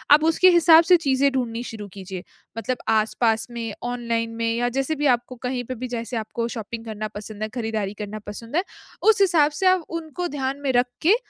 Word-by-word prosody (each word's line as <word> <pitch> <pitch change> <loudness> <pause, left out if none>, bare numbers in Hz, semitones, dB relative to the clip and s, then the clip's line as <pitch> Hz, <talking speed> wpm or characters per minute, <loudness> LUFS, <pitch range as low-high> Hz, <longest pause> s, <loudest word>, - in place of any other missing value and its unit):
अब 305 - 0
उसके 370 +3 +5
हिसाब 335 -1 +7
से 360 - +9
चीज़ें 270 +1 +3
ढूँढनी 240 -3 -2
शुरू 210 -2 -7
कीजिए 190 -2 -7 0.3
मतलब 245 +3 -2
आस-पास 225 +1 +2
में, 230 -3 -4
ऑनलाइन 235 -2 -2
में 230 0 0
या 245 +1 +1
जैसे 310 +4 0
भी 295 +1 -2
आपको 245 +1 -11
कहीं 250 -1 -2
पे 255 - -5
भी 255 +2 -5
जैसे 235 0 -4
आपको 230 +2 -3
शॉपिंग 225 +1 -6
करना 215 -1 -4
पसंद 210 0 -7
है, 215 - -2
खरीदारी 220 -4 -3
करना 210 +1 -5
पसंद 230 +6 -7
है, 360 - +3 0.4
उस 440 -2 +4
हिसाब 320 -6 +4
से - - +1
आप 370 -3 +3
उनको 335 +1 -4
ध्यान 270 +1 -2
में 270 - +1
रख 245 +1 +3
के 365 +7 +5
240 Hz, 205 wpm, -23 LUFS, 220-285 Hz, 0.4 s, से